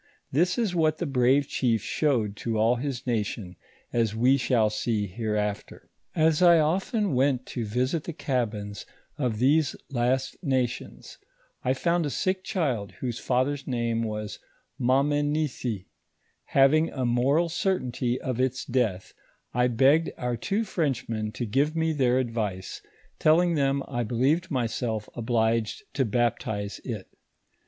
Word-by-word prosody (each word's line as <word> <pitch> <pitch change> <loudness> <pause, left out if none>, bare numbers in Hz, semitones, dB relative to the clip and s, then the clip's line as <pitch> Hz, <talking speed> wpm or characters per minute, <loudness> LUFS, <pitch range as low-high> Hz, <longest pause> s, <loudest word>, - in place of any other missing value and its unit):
This 175 - +2
ia 235 - +2
what 155 -2 +2
the 175 - -2
bravo 135 0 +3
chief 120 -6 0
showed 120 -9 0
to 115 -2 -2
all 115 +3 +3
his 130 -1 -4
nation, 105 -5 -2 0.4
as 115 -3 +1
wo 125 +4 +4
shall 120 -5 +2
see 105 -1 -1
hereafter. 105 0 -3 0.2
As 160 -1 +3
I 175 -2 +7
often 190 - +1
went 130 0 +2
to 120 - -2
visit 130 +9 -1
the 170 - -4
cabins 105 -8 -3 0.3
of 125 -6 0
these 140 +5 +3 0.2
last 130 +1 0
nations, 130 -4 -2 0.4
I 130 +1 +1
found 170 +2 +1
a - - -2
sick 185 +5 -1
child, 135 - -1
whose 120 -2 -4
father's 135 +2 0
name 115 -2 0
was 105 -2 -4 0.4
Mamenisi; 140 -4 0 0.6
having 150 +4 +4
a 130 -2 -3
moral 135 +8 +2
certainty 130 -9 -1
of 125 -2 -3
its 130 0 0
death, 115 -7 -1 0.4
I 125 +1 +3
begged 135 +7 +4
our 125 -1 -1
two 200 - -1
Frenchmen 125 - -2
to 120 - -3
give 140 +8 +1
mo 160 0 +1
their 130 -4 +2
advice, 110 -7 -3 0.4
tolling 170 +3 +4
them 140 -2 +1
I 120 -3 -2
believed 130 - +1
myself 115 -4 -2
obliged 115 -2 0
to 135 - +1
baptize 110 -3 -1
it. 110 -7 -5
125 Hz, 140 wpm, -27 LUFS, 115-145 Hz, 0.6 s, I